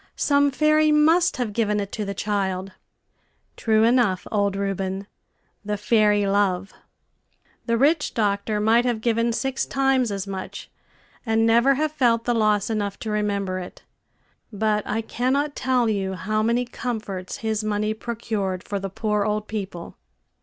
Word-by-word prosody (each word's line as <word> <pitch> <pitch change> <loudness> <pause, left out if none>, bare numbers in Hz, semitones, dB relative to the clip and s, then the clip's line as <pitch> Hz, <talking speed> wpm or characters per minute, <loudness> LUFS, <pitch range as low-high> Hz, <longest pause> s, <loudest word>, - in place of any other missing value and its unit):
Some 285 0 +3
fairy 305 +2 +3
must 315 +3 +4
have 240 -5 -2
given 210 -2 +1
it 200 -1 -4
to 215 - -3
the 200 0 -4
child. 195 -2 -2 0.8
True 220 -1 +2
enough, 230 -5 +2
old 200 -2 +1
Reuben 195 0 -2 0.6
the 210 0 -2
fairy 210 -1 +3
LOVE! 195 -1 0 0.9
The 230 0 +2
rich 295 +5 +2
doctor 210 0 0
might 225 +3 +4
have 240 -3 0
given 230 +1 +1
six 265 +3 -1
times 270 -4 +1
as 195 -1 -3
much, 195 -1 -7 0.5
and 225 -1 +2
never 235 +4 +4
have 305 +2 0
felt 240 -6 +2
the 240 - +1
loss 215 -3 +2
enough 205 -3 -2
to 220 - -3
remember 200 -3 -1
it. 180 - -10 0.7
But 210 0 0
I 220 +2 -1
cannot 275 +6 -1
tell 255 -2 +1
you 195 -3 -1
how 215 +3 -1
many 235 +3 +1
comforts 215 -7 -5
his 220 -1 0
money 215 0 0
procured 215 -5 -3
for 200 - -3
the 195 0 -4
poor 210 +1 -1
old 210 0 -2
people. 195 -5 -6
215 Hz, 155 wpm, -23 LUFS, 200-240 Hz, 0.9 s, must